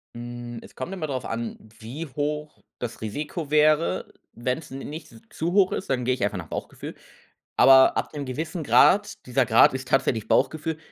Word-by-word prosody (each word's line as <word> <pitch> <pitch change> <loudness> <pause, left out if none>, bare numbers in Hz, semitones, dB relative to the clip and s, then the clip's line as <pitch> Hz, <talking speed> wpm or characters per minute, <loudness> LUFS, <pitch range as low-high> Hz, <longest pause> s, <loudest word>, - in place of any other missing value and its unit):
Hm, 120 0 -7
es - - -15
kommt 150 +9 -5
immer 170 -5 -4
drauf 130 -4 -4
an, 115 0 -4 0.2
wie 125 +9 -6
hoch 150 +2 -4 0.2
das 120 -2 -6
Risiko 145 - -5
wäre. 155 +1 +2 0.2
Wenn's 125 +6 -3
n 135 - -6
nicht 150 +4 -8
z 115 -2 -16
zu 170 +2 -2
hoch 195 -2 +4
ist, - - -4
dann 125 -2 0
gehe 130 - +2
ich 125 - -3
einfach 100 -1 0
nach 85 -3 -7
Bauchgefühl. - - -7 0.6
Aber 130 0 +7
ab - - -2
'nem 145 -2 -4
gewissen 160 +6 -4
Grad, 205 +7 +4
dieser 125 +1 +1
Grad 115 +1 +6
ist 130 0 -5
tatsächlich 115 -5 +1
Bauchgefühl, 160 0 +1
135 Hz, 185 wpm, -25 LUFS, 120-155 Hz, 0.6 s, Aber